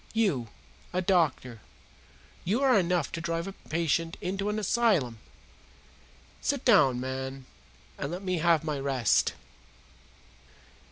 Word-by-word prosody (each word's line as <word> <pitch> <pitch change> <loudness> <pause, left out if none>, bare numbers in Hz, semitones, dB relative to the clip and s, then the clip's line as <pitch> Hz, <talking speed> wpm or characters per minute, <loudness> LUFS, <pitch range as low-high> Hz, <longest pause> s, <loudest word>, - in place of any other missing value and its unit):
You, 185 - +1 0.5
a 185 - +1
doctor 145 - +1 0.8
you 220 +10 0
are 260 -2 +5
enough 175 -4 0
to 165 - -4
drive 165 0 -2
a 195 - -5
patient 165 -1 -1
into 195 +2 -2
an 210 - -1
asylum. 200 - +1 1.2
Sit 280 -2 -1
down, 145 - +5
man, 130 +1 -5 0.5
and 140 - -3
let 180 +3 -5
me 185 -2 -1
have 165 -1 +3
my 150 -3 -2
rest!" 135 -5 +2
170 Hz, 120 wpm, -28 LUFS, 135-195 Hz, 1.2 s, are